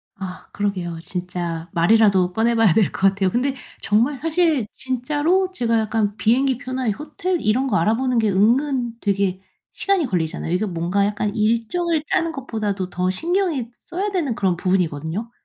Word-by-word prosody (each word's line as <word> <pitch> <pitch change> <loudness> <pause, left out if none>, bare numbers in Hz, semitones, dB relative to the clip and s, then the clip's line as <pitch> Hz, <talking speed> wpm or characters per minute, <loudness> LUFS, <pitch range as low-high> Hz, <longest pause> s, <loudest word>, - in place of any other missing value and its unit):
아 185 -2 -8
그러게요. 185 -5 -2
진짜 175 -2 -4
말이라도 185 0 +4
꺼내봐야 225 -3 +3
될 215 0 +3
거 195 - +2
같아요. 190 -1 0
근데 260 +7 0 0.3
정말 235 +8 +2
사실 320 -5 +1
진짜로 295 +9 0
제가 230 -8 +1
약간 215 -1 0
비행기 255 +3 +2
표나 255 -1 -3
호텔 310 - -3
이런 250 +6 +1
거 210 -5 +1
알아보는 235 +7 +1
게 220 -2 +2
은근 240 +5 +2
되게 195 -2 0 0.3
시간이 395 -5 +1
걸리잖아요. 165 -4 -2
이게 180 +5 +1
뭔가 180 +2 0
약간 205 0 -1
일정을 235 +10 0
짜는 330 +2 0
것보다도 215 - -3
더 180 0 -1
신경이 330 - -1
써야 380 +10 -4
되는 300 - -1
그런 185 -3 0
부분이거든요. 180 +3 -1
220 Hz, 355 characters per minute, -21 LUFS, 190-270 Hz, 0.3 s, 말이라도